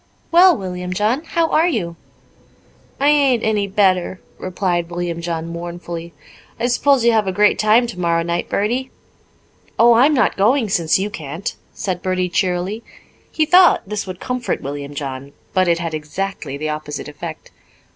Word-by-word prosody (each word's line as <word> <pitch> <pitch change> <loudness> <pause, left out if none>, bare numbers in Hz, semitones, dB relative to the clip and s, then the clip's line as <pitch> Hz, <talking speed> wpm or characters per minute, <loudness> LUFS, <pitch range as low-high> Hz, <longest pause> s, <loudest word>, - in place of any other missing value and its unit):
"Well, 350 -1 +6
William 180 -1 -5
John, 220 - 0
how 330 -1 0
are 325 +2 +3
you?" 180 - -2 1.0
"I 285 +2 +3
ain't 275 -6 +3
any 210 -2 +1
better," 190 -2 +1 0.2
replied 175 -2 -2
William 175 -1 -3
John 165 -1 -3
mournfully. 170 0 -6 0.5
"I 235 - 0
s'pose 250 +1 +2
you'll 235 - +5
have 215 -3 +2
a - - +1
great 210 +2 +3
time 215 +3 +4
tomorrow 170 -7 -1
night, 170 0 -2
Bertie?" 245 +6 -1 0.9
"Oh, 235 +1 +6
I'm 270 +6 +5
not 250 - +2
going 225 +3 +2
since 170 -4 +2
you 200 +2 -2
can't," 160 +3 -5 0.2
said 180 -3 -3
Bertie 185 -1 -1
cheerily. 185 +4 -1 0.5
He 315 - +1
thought 360 +3 +5
this 210 0 -4
would 185 -1 -7
comfort 250 -1 -2
William 145 +1 -6
John, 140 0 -6 0.2
but 185 -1 +2
it 170 -1 +3
had 165 -1 -4
exactly 155 -1 -4
the 155 +1 -3
opposite 150 -1 -5
effect. 155 +2 -8
185 Hz, 160 wpm, -19 LUFS, 170-230 Hz, 1.0 s, Well